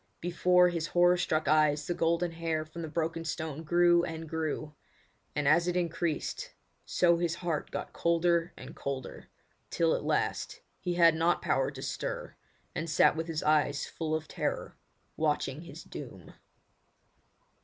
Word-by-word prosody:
Before 180 +1 +4
his 165 -2 -2
horror 175 0 +4
struck 155 -3 0
eyes 150 0 +3
the 175 - -1
golden 170 +1 +1
hair 165 -1 -2
from 155 +2 -8
the 160 - -4
broken 165 +1 -2
stone 160 -2 -4
grew 175 +1 +4
and 160 -1 -5
grew; 155 -1 -3 0.6
and 145 -1 0
as 170 +4 +4
it 180 0 +1
increased, 170 -2 -2 0.3
so 170 -1 +3
his 170 -1 0
heart 170 -4 -3
got - - -5
colder 170 0 +2
and - - -10
colder, 135 -2 -6 0.4
till 165 -1 +2
at - - -1
last - - -1 0.2
he 180 -2 -2
had 170 -2 +6
not 165 +2 +2
power - - +1
to - - -8
stir, - - -4 0.4
and 165 +1 -3
sat 155 - +4
with 160 +1 -3
eyes 150 -2 +2
full 155 -1 -3
of 155 0 -4
terror - - -3 0.4
watching 150 -2 0
his 170 - -10
doom. - - -10
165 Hz, 155 wpm, -30 LUFS, 155-175 Hz, 0.6 s, had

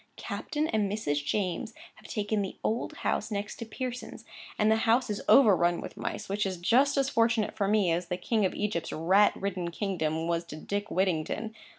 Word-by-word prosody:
Captain 305 +1 -3
and 210 -3 0
Mrs. 145 -9 -1
James 190 +5 -2 0.2
have - - -14
taken 210 0 -1
the 195 - -5
old 225 +3 -1
house 215 - 0
next 205 +1 -4
Pearson's; 250 +1 -6 0.3
and 215 0 +3
the 220 - +4
house 235 0 +3
is 205 - -3
overrun 175 -9 +5
with - - -7
mice, - - -4
which 205 +2 -1
is 190 -2 -2
just 255 +11 +3
as 275 -1 +3
fortunate 230 -4 +1
for 200 -2 0
me 205 -4 +3
as 175 +2 -1
the 180 - -2
King 220 +2 0
of 190 - 0
Egypt's 205 -6 -2
rat 190 +6 +4
ridden 185 -3 -3
kingdom 165 -4 -2
was 170 0 0
to 160 - -8
Dick 205 +6 -4
Whittington. 190 +4 -1
205 Hz, 190 wpm, -29 LUFS, 175-220 Hz, 0.3 s, overrun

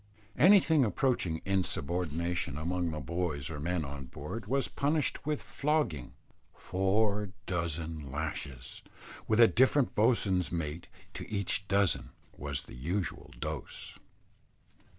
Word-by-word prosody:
Anything 165 -5 +6
approaching 110 - 0
insubordination 85 -4 -1
among 85 +2 -1
the 75 -1 -3
boys 75 -1 -2
or 75 - -5
men 85 +1 -1
or 70 +1 -6
board 75 - -7
was 135 +3 +1
punished 150 0 0
with 150 -1 -1
flogging 145 - -1 0.4
four 100 +2 +1 0.2
dozen 80 -4 -3
lashes, 70 -3 -4 0.5
with 110 +1 +2
a 115 - +10
different 130 +2 +3
bo'swain's 105 -5 +2
mate 85 -1 -3 0.3
to - - -7
each 100 -1 0
dozen, 100 -1 +3 0.3
was 70 -1 -3
the - - -13
usual 85 +9 -3
dose. - - -6
90 Hz, 115 wpm, -31 LUFS, 75-110 Hz, 0.5 s, a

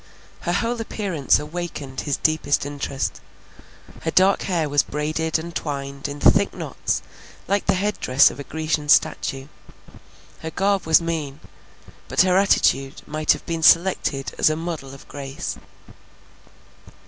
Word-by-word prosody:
Her 175 - -2
whole 230 +4 -1
appearance 190 -10 0
awakened 150 -4 -5
his 145 -2 -1
deepest 155 -3 +1
interest. 140 -1 -4 0.8
Her 160 - -2
dark 190 +4 +4
hair 170 -5 0
was 145 -1 +3
braided 155 +2 -2
and 170 +1 -7
twined 140 -2 -4
in 145 0 -7
thick - - +4
knots - - -3 0.4
like 200 +1 0
the - - +3
head 205 +3 -1
dress 130 +2 +5
of - - -11
a - - -5
Grecian 155 0 -2
statue; 135 -2 +2 0.9
her 160 - -5
garb 195 +1 0
was 160 +1 +6
mean, 155 -4 -3 0.7
but - - +3
her 185 -1 +2
attitude 135 -8 +2
might 155 0 +2
have - - -9
been 165 -1 -3
selected 165 -5 +3
as - - +5
a 155 - 0
model 160 -5 -5
of 135 - -15
grace. 135 -1 -6
155 Hz, 145 wpm, -22 LUFS, 140-175 Hz, 0.9 s, was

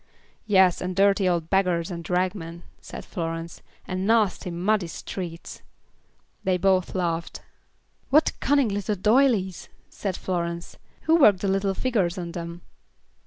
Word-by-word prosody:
"Yes, 190 -4 +4
and 180 0 -3
dirty 195 -1 +3
old 170 -2 -1
beggars 180 -2 +1
and 170 -1 -5
ragmen," 180 -2 -2 0.2
said - - -9
Florence, 165 -1 -5 0.3
"and 185 +1 -2
nasty, 215 -5 +2
muddy 180 +2 0
streets." 170 0 -7 0.8
They 185 -1 +1
both 185 0 +1
laughed. 170 -2 -2 0.7
"What 305 +3 +4
cunning 280 -4 +2
little 205 +1 -2
doylies," 210 -3 +2 0.2
said 195 -3 -4
Florence. 170 -2 -4 0.2
"Who 320 +1 +3
worked 210 - +5
the 200 - -1
little 195 0 0
figures 200 -8 0
on 170 -2 -5
them?" 170 0 -7
185 Hz, 130 wpm, -25 LUFS, 170-200 Hz, 0.8 s, worked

